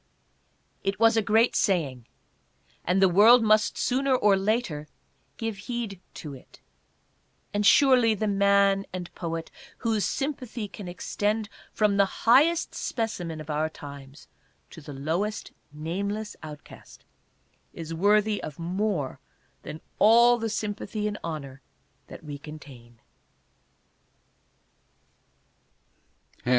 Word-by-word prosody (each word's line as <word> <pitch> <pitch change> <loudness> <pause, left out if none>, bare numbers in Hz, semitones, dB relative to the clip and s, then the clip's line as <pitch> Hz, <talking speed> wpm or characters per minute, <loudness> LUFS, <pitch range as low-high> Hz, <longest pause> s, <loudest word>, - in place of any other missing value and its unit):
It 195 0 -2
was 225 0 +5
a 225 - +3
great 220 +3 +3
saying, 145 - 0 0.8
and 180 +2 +1
the - - +7
world 220 +7 +7
must 215 0 +3
sooner 265 +1 +1
or 205 -5 +4
later 195 -7 -1 0.5
give 225 -3 -3
heed 230 -6 -4
to 150 -3 -7
it; 130 - -15 0.9
and 205 0 0
surely, 250 -1 +5
the 215 +1 -1
man 200 0 +3
and 180 -1 -6
poet 165 -1 -5 0.3
whose 220 -3 0
sympathy 255 -6 -3
can 200 -1 -9
extend 205 +4 -2 0.2
from 210 -2 +1
the 195 -1 0
highest 295 +9 +4
specimen 180 -9 -3
of 155 0 -6
our 155 +1 0
times 140 -1 -11 0.4
to 160 - -11
the 145 - -10
lowest 165 +10 -3 0.2
nameless 200 +8 -4
outcast, 150 -2 -12 0.7
is 165 0 -7
worthy 210 +4 +2
of 150 - -7
more 175 -4 -2 0.4
than 155 +1 -8 0.2
all 235 +3 +6
the 225 0 -2
sympathy 210 0 -3
and 210 0 -4
honor 140 -5 -6 0.5
that - - -11
we 145 -2 -7
contain. 135 -6 -12
200 Hz, 115 wpm, -26 LUFS, 160-220 Hz, 0.9 s, the